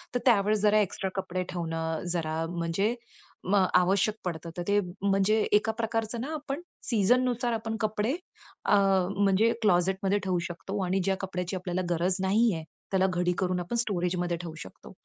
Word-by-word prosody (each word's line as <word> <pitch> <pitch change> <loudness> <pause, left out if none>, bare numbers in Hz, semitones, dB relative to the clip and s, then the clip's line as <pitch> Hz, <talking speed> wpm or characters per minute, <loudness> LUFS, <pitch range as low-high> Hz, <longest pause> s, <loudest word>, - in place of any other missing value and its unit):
तर - - +3
त्यावेळेस 210 -3 +4
जरा 210 0 +4
एक्स्ट्रा 195 -1 -1
कपडे 185 0 -3
ठेवणं, 165 -2 -3
जरा, 160 -1 -1
म्हणजे 175 +6 0 0.5
म 195 - +1 0.2
आवश्यक 190 +4 +3
पडतं. 170 -1 -4
तर - - -2
ते, 205 0 +4 0.2
म्हणजे 195 +1 +3 0.2
एका 210 +2 +4
प्रकारचं 225 0 -2
ना 290 +6 -4
आपण 295 0 -4 0.2
सीझननुसार 245 +2 +2
आपण 225 0 -3
कपडे 215 +3 0 0.5
अ, - - +4 0.4
म्हणजे 200 +3 +4
क्लॉझेटमध्ये 190 +1 +2
ठेवू 185 -2 0
शकतो 190 +4 -5
आणि 185 +2 +1
ज्या 195 -1 +2
कपड्याची 185 -1 -3
आपल्याला 180 0 -2
गरज 175 +2 +1
नाही 210 +4 +3
आहे, 160 -1 -4 0.3
त्याला 190 -1 +3
घडी 180 0 +1
करून 185 -1 0
आपण 175 +7 -4
स्टोरेजमध्ये 180 -5 0
ठेवू 170 -2 -7
शकतो 95 - -11
195 Hz, 160 wpm, -28 LUFS, 180-215 Hz, 0.5 s, त्यावेळेस